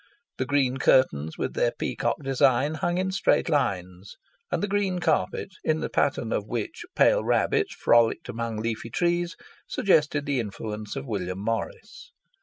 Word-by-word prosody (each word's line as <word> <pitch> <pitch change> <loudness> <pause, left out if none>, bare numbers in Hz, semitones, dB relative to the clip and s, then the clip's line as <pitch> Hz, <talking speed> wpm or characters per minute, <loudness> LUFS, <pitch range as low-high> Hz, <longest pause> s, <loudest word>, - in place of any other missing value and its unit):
The 130 - -1
green 135 -2 +1
curtains 80 - +2
with - - -2
their - - +1
peacock - - -2
design, 135 +2 +2
hung 175 +3 -1
in 190 +1 0
straight 190 - +2
lines, 95 - -2 0.4
and 175 0 -1
the - - +1
green 195 -2 0
carpet, 165 0 0
in 155 0 +1
the - - -2
pattern - - 0
of - - -2
which 335 - -4
pale - - +4
rabbits 415 -3 +1
frolicked 115 -1 +3
among 115 -1 -4
leafy 115 +1 -3
trees, 175 +5 0 0.3
suggested 150 - +2
the 140 -2 0
influence 105 0 -5
of 135 0 -5
William 95 -6 -3
Morris. 115 - -5
135 Hz, 155 wpm, -26 LUFS, 110-175 Hz, 0.4 s, pale